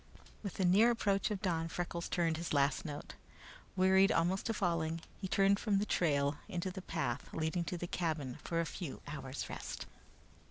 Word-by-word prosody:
With 200 -4 -5
the 190 - +1
near 200 +7 +6
approach 200 -4 +1
of 205 -1 -3
dawn 165 -4 +1
Freckles 170 0 -3
tuned 165 -2 +1
his 170 -1 -3
last 140 +1 +2
note. 145 -2 -6 0.6
Wearied 190 +2 +5
almost 180 +2 +1
to 225 - +1
falling, 165 -4 0 0.2
he 190 - -3
turned 195 +1 +4
from 210 -3 +2
the 205 - +1
trail 145 -6 +1
into 185 -1 -2
the 190 +1 -6
path 170 -2 -2
leading 160 +2 0
to 175 +3 -3
the 175 - -3
cabin 155 -7 -2
for 165 - -1
a 170 - +1
few 160 -2 -6
hours' 135 -2 -5
rest. - - -5
175 Hz, 185 wpm, -35 LUFS, 160-190 Hz, 0.6 s, near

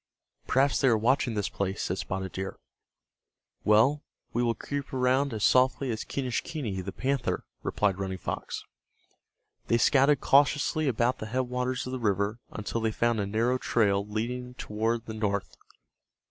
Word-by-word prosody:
"Perhaps 135 +2 +3
they 135 - +4
are 115 -3 +5
watching 120 +1 +2
this 105 -1 0
place," 95 0 -3
said 90 +2 -2
Spotted 95 0 -3
Deer. 95 +1 -5 1.1
"Well, 115 +8 +4 0.3
we 120 - +1
will 120 -1 +1
creep 140 -1 -5
around 130 +2 +2
as 110 -2 -3
softly 130 0 +3
as 110 - -3
Quenischquney, 125 - -3
the 100 - -5
panther," 135 +3 -1 0.2
replied 100 -2 0
Running 95 -1 -3
Fox. - - -5 1.0
They 115 - +3
scouted 140 +3 +4
cautiously 145 +2 +3
about 120 0 +1
the 110 - -5
headwaters 125 +1 -1
of 130 - -5
the 130 - -3
river 100 0 0
until 110 +2 -4
they 110 0 +1
found 120 0 +1
a 100 - -1
narrow 115 +5 +1
trail 100 -6 +2
leading 125 +4 -4
toward 115 +2 -2
the 110 - -6
north. 100 -2 -2
115 Hz, 155 wpm, -28 LUFS, 105-130 Hz, 1.1 s, are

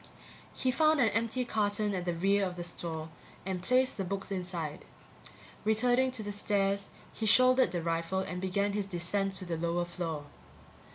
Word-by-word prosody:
He 255 - +1
found 310 +2 +4
an 235 -4 +5
empty 230 +3 0
carton 210 -2 0
at 180 -2 -2
the 175 -1 -1
rear 195 +4 +2
of 180 -2 -2
the 175 - -5
store 160 -2 -5 0.4
and 190 -2 -2
placed 255 +6 +2
the 195 - -1
books 195 +2 -4
inside. 175 -5 -4 0.8
Returning 245 +4 +3
to 230 -4 -2
the 205 - -4
stairs, 200 -1 0 0.2
he 220 - -2
shouldered 255 +3 +6
the 175 -2 -2
rifle 165 +3 -1
and 180 -1 -4
began 200 +2 0
his 205 -1 -1
descent 195 +2 -1
to 190 - -4
the 170 -2 -3
lower 170 +1 0
floor. 165 -4 -4
195 Hz, 175 wpm, -31 LUFS, 175-220 Hz, 0.8 s, shouldered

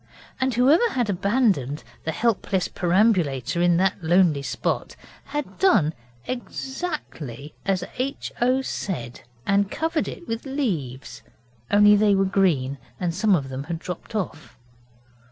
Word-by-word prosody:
And 260 -2 +1
whoever 295 - +5
had 240 -5 +1
abandoned 195 - +1 0.2
the 160 - 0
helpless 195 -2 0
perambulator 175 - +1
in 175 -1 +4
that 190 0 +1
lonely 170 -3 +4
spot 140 - -2 0.3
had 295 0 -5
done 190 - +4 0.3
exactly 255 - -5
as 195 -2 +1 0.2
H. 270 +2 -2
O. 255 +2 +3
said, 125 - -4 0.2
and 200 0 +2
covered 320 +3 -1
it 345 - -8
with 225 0 -3
leaves, 170 - -3 0.5
only 210 0 +7
they 205 -1 +4
were 195 0 +3
green 160 -9 +1 0.2
and 175 -2 -1
some 205 +2 +3
of 135 -5 -2
them 130 +2 -5
had 165 +1 -3
dropped 180 +6 -7
off. 180 -6 -4
195 Hz, 135 wpm, -24 LUFS, 160-240 Hz, 0.5 s, only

